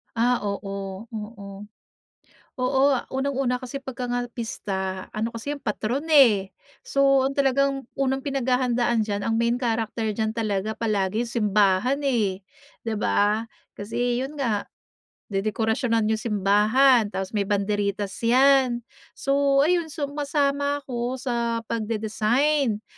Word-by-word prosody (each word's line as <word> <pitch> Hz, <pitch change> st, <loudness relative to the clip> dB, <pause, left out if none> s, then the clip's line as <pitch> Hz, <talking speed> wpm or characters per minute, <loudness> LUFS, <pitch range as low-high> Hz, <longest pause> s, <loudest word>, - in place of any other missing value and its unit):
Ah, 240 Hz, +2 st, +3 dB
oo, 195 Hz, +1 st, -5 dB
oo. 210 Hz, -2 st, -8 dB, 0.9 s
Oo, 265 Hz, +1 st, +1 dB, 0.3 s
unang-una 265 Hz, -2 st, 0 dB
kasi 255 Hz, +2 st, -5 dB
pagka 255 Hz, -2 st, -6 dB
nga 245 Hz, 0 st, -1 dB
pista, 190 Hz, -5 st, -4 dB
ano 220 Hz, +2 st, -1 dB
kasi 240 Hz, +6 st, -4 dB
'yon 285 Hz, -, -12 dB
patron 230 Hz, +5 st, -2 dB
eh. 220 Hz, -10 st, +5 dB, 0.3 s
So, 275 Hz, -1 st, +3 dB
ang 275 Hz, +1 st, -2 dB
talagang 275 Hz, -1 st, +1 dB
unang 270 Hz, 0 st, 0 dB
pinaghahandaan 250 Hz, -4 st, +1 dB
diyan, 200 Hz, -1 st, -2 dB
ang 225 Hz, 0 st, 0 dB
main 235 Hz, +2 st, 0 dB
character 225 Hz, -1 st, -1 dB
diyan 220 Hz, +1 st, -2 dB
talaga 215 Hz, -1 st, -1 dB
palagi 210 Hz, -1 st, 0 dB
simbahan 215 Hz, +3 st, +1 dB
eh, 210 Hz, -8 st, 0 dB, 0.4 s
'di 225 Hz, -1 st, -2 dB
ba? 210 Hz, +2 st, +1 dB, 0.3 s
Kasi, 240 Hz, +4 st, -1 dB
yun 290 Hz, +3 st, -7 dB
nga, 215 Hz, -6 st, 0 dB, 0.7 s
dedekorasyonan 220 Hz, +2 st, 0 dB
yung 220 Hz, -, 0 dB
simbahan, 215 Hz, +4 st, +3 dB
tapos 190 Hz, -2 st, -4 dB
may 205 Hz, -2 st, 0 dB
banderitas 205 Hz, -1 st, -1 dB
yan. 255 Hz, 0 st, +4 dB, 0.3 s
So, 275 Hz, 0 st, +2 dB
ayun, 340 Hz, 0 st, +2 dB
sumasama 285 Hz, -1 st, -1 dB
ako 245 Hz, 0 st, -3 dB
sa 235 Hz, -2 st, -2 dB
pagde-design 225 Hz, +3 st, 0 dB
235 Hz, 120 wpm, -24 LUFS, 210-270 Hz, 0.9 s, eh